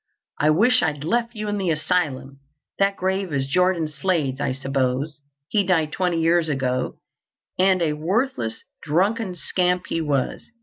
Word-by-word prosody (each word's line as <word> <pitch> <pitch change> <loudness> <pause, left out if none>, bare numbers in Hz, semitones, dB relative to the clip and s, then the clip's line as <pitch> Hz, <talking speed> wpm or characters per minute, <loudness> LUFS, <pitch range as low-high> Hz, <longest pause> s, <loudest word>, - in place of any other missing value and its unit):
I 150 - +3
wish 220 +11 +4
I'd 150 -3 -1
left 235 +7 0
you 215 0 -4
in 205 0 -1
the 185 -3 0
asylum. 150 -4 -1 0.4
That 195 0 +3
grave 190 -1 -1
is 135 -2 0
Jordan 180 +2 +2
Slade's, 150 -3 -1
I 140 - 0
suppose. 135 +2 -2 0.3
He 205 +3 +2
died 165 -5 +1
twenty 180 -2 0
years 165 0 +2
ago, 130 -3 -1 0.6
and 185 -1 +4
a 155 -2 +1
worthless, 160 - -1 0.2
drunken 190 - +1
scamp 180 +1 0
he 165 - -1
was. 140 -4 -1
165 Hz, 155 wpm, -23 LUFS, 145-190 Hz, 0.6 s, wish